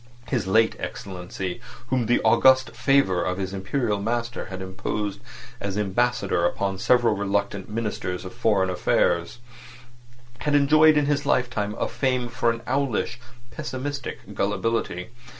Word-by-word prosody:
His 120 -8 -1
late 110 +3 +3
Excellency, 90 -1 -5 0.3
whom 125 -3 +1
the 120 - +3
august 130 -2 +5
favour 120 -7 +2
of 90 0 -1
his 95 -1 -3
Imperial 105 +2 -1
master 120 +2 -2
had 95 -1 -7
imposed 95 0 -3 0.4
as 100 0 -3
Ambassador 105 -2 +1
upon 95 +2 0
several 120 -1 +3
reluctant 100 -1 -1
Ministers 105 -5 -3
of 95 - -7
Foreign 105 -5 +2
Affairs, 85 +1 +1 1.0
had 150 -1 0
enjoyed 155 +2 +6
in 150 - +3
his 145 0 0
lifetime 110 -6 0
a - - 0
fame 125 -3 -1
for 120 0 0
an 115 0 -2
owlish, 125 -3 -1 0.3
pessimistic 130 -5 -5
gullibility. 105 -1 -1
110 Hz, 135 wpm, -24 LUFS, 95-125 Hz, 1.0 s, enjoyed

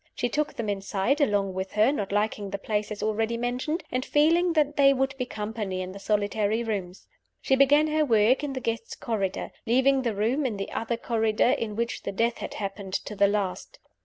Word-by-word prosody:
She 245 - -1
took 300 +5 -1
them 230 - -3
inside, 200 +7 0
along 205 -7 +1
with 190 +1 -4
her 215 +5 +4
not 205 -10 -3
liking 205 0 -1
the 200 - -3
place, 210 +1 -2
as 210 - -5
already 225 +2 0
mentioned, 250 +8 -2
and 255 +1 -1
feeling 335 +5 +3
that 295 -2 +2
they 275 -1 +6
would 270 0 0
be 250 -2 -3
company 210 -4 -4
in 185 - -6
the 200 - -9
solitary 210 +2 0
rooms. 195 -5 -4 0.3
She 265 - +2
began 280 +3 +5
her 310 0 +1
work 235 +1 +3
in 285 -2 -2
the 260 - -4
Guests' 230 -1 -3
Corridor 200 -5 -3 0.2
leaving 265 +3 +3
the 235 -4 -1
room 235 +9 +1
in 235 -6 -1
the 195 - -5
other 230 +1 -2
corridor, 225 0 +1
in 230 -6 -2
which 235 +2 -2
the - - -4
death 230 +4 0
had - - -6
happened, 195 -1 -5
to 210 - -4
the 200 0 +4
last. 200 -2 -2
225 Hz, 210 wpm, -26 LUFS, 205-265 Hz, 0.3 s, they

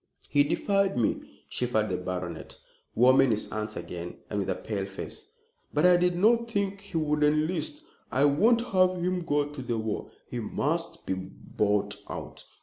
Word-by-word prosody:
"He 145 - +4
defied 195 +5 +1
me," 115 - -2
shivered 110 -4 0
the 90 - -1
baronet, 90 -2 -5 0.4
warming 130 +2 +6
his 110 -2 0
hands 110 0 -3
again 85 0 -6
and 105 - 0
with 100 - -2
a - - +1
pale 100 -3 -3
face; 95 - -6 0.5
"but 150 +3 +4
I 180 0 +7
did 180 0 +2
not 230 +5 +3
think 200 -2 -1
he 200 -4 -5
would 150 -1 +1
enlist. 155 - +1 0.3
I 135 +3 +3
won't 220 +12 +4
have 185 -2 +3
him 180 +1 0
go 145 -2 +1
to 145 -2 -7
the 120 -2 -2
war. 110 -1 -3 0.2
He - - -4
must - - -2
be - - 0
bought 100 +2 -1
out." - - -7
145 Hz, 170 wpm, -28 LUFS, -, 0.5 s, I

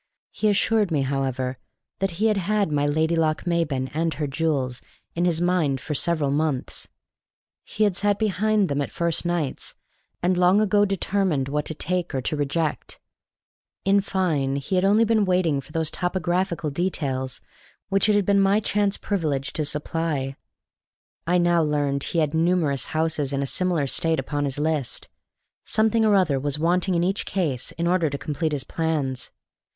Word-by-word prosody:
He 215 - +1
assured 210 0 +2
me, 150 -5 +1
however, 130 -1 -2 0.4
that 195 -3 -1
he 215 - +1
had 215 -2 +3
had 200 -1 0
my 145 0 +1
Lady 160 +3 +1
Lochmaben 155 -4 0
and 165 +1 0
her 150 - -2
jewels 135 -4 -1 0.3
in 170 +1 0
his 170 -2 +1
mind 170 -6 +1
for 150 - -4
several 150 -2 +1
months; 145 -3 -1 0.8
he 215 - -2
had 205 -4 +2
sat 205 +1 +1
behind 215 0 +1
them 145 -1 -1
at 140 - -2
first 170 0 -1
nights; 170 -6 -2 0.5
and 180 0 +2
long 180 +3 +5
ago 205 -1 +3
determined 190 -7 0
what 150 +1 -1
to 160 - -4
take 180 -1 -2
or 130 - 0
to 155 - -1
reject; 150 +2 -2 0.9
in 200 +1 +4
fine, 160 -9 0
he 140 +6 -4
had 185 0 +3
only 210 +4 +4
been 220 -1 +3
waiting 180 -7 +1
for 145 - -17
those 160 -1 -1
topographical 180 -2 -1
details 140 -6 -2 0.5
which 195 +1 +2
it 210 - +4
had 205 -2 +2
been 200 0 +4
my 195 +2 +4
chance 205 -1 0
privilege 150 -9 -2
to 155 - -1
supply. 150 -2 -2 0.9
I 180 +1 +3
now 175 -1 +3
learned 145 -2 0
that - - -4
he - - -3
had 150 -1 0
numerous 160 -4 +1
houses 155 -3 -1
in 140 0 0
a - - -1
similar 175 0 0
state 160 +3 0
upon 145 +2 -2
his 135 -1 -2
list; 150 -3 -2 0.5
something 220 +1 +2
or 215 -2 +4
other 160 -8 +2
was 145 +1 -2
wanting 180 +3 +1
in 170 - +2
each 190 +3 0
case 150 -11 -2
in 170 - -3
order 170 -2 +2
to 140 - -4
complete 155 +2 -2
his 145 -3 -2
plans. 145 -6 -2
165 Hz, 175 wpm, -24 LUFS, 145-185 Hz, 0.9 s, long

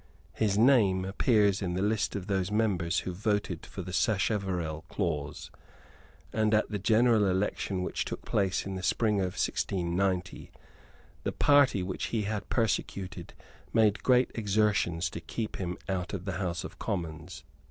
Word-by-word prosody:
His 105 -2 +1
name 105 -6 +4
appears 100 0 +2
in 90 -2 -2
the 95 - -1
list 105 0 0
of 100 -3 -4
those 95 -2 0
members 95 -7 +1
who 90 - -4
voted 105 -3 -2
for 95 - -7
the 90 +1 -7
Sacheverell 95 -6 0
clause; 75 -6 -3 0.8
and, 110 0 +2
at 110 - +1
the 105 - -2
general 110 +1 +4
election 95 0 -1
which - - -2
took - - -6
place 95 -3 0
in 95 - -4
the 95 - -4
spring 105 +2 +1
of 90 -2 -2
1690, 90 0 -1 0.7
the - - -2
party 145 -9 +4
which 95 0 -3
he 110 -2 -1
had 105 -1 -3
persecuted 95 -5 -2 0.4
made 110 -2 +3
great 125 0 +3
exertions 105 -5 +1
to 85 - -6
keep 110 +6 -4
him 90 -2 -3
out 95 0 -2
of 90 -2 -6
the 95 -3 -3
House 85 -2 -2
of - - -9
Commons. 85 -4 -4
95 Hz, 155 wpm, -29 LUFS, 90-105 Hz, 0.8 s, name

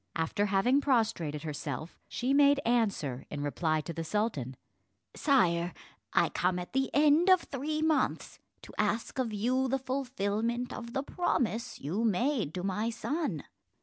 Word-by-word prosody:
After 185 +6 0
having 235 +8 +3
prostrated 220 - 0
herself, 150 0 -5
she 255 +2 -1
made 285 0 +5
answer, 200 - 0
in 145 -1 -4
reply 155 +2 0
to 160 +3 -6
the 165 - -4
sultan: 160 - -2 0.6
"Sire, 175 - +2 0.4
I - - +3
come 180 0 0
at 180 0 -6
the 265 0 +1
end 300 +5 +4
of 370 -2 +7
three 305 +3 -3
months 315 -2 0 0.2
to - - -12
ask 215 +5 0
of 245 -4 0
you 250 +6 +1
the 270 +1 +1
fulfillment 245 -3 -2
of 235 0 -7
the 270 - -1
promise 250 -8 -1
you 180 +11 -2
made 225 - +1
to 180 - -3
my 210 +4 -1
son." 235 - -2
225 Hz, 150 wpm, -30 LUFS, 175-265 Hz, 0.6 s, of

